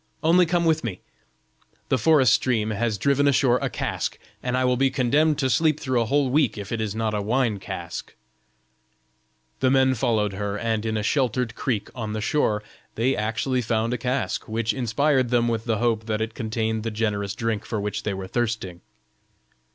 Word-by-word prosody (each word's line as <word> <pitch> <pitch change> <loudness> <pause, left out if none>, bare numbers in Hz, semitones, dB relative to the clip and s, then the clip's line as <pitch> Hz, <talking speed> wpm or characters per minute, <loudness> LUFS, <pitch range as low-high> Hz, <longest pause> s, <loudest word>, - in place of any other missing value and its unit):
Only 175 +2 +5
come 170 0 +1
with 160 -1 +2
me; 100 -7 -4 0.9
the 130 - +3
forest 135 -4 +5
stream 110 -4 +1
has 110 0 -1
driven 140 +6 +2
ashore 125 -2 +3
a - - -1
cask, - - -3 0.2
and 125 0 -1
I 130 - +2
will 125 0 +3
be 135 +2 +2
condemned 145 +4 +2
to 135 - +1
sleep 155 +5 +2
through 130 -4 0
a 115 - -1
whole 140 0 +2
week 140 -6 +2
if 100 -1 -7
it 115 -2 -1
is 105 -1 -3
not 110 -1 -1
a 105 - -1
wine 115 -1 0
cask." - - -7 1.4
The 130 - +3
men 130 0 +4
followed 110 -5 0
her, 100 +1 -3
and 110 0 -1
in 110 0 -1
a 105 - -2
sheltered 125 -1 0
creek 115 -5 -2
on 110 -3 -4
the 110 - -2
shore, 105 -4 +1 0.3
they 125 +4 +1
actually 115 +4 -1
found 115 0 0
a - - -1
cask, 130 +3 -2
which 115 +1 0
inspired 130 +1 +1
them 120 -1 +2
with 115 -1 -1
the 115 -3 0
hope 115 -1 0
that 110 -1 -1
it 110 0 -3
contained 110 -1 -2
the 115 - -2
generous 105 -2 -2
drink 115 -2 -2
for 110 - -3
which 105 0 -3
they 100 -2 -2
were 95 0 -6
thirsting. 105 -6 -2
115 Hz, 195 wpm, -24 LUFS, 110-130 Hz, 1.4 s, Only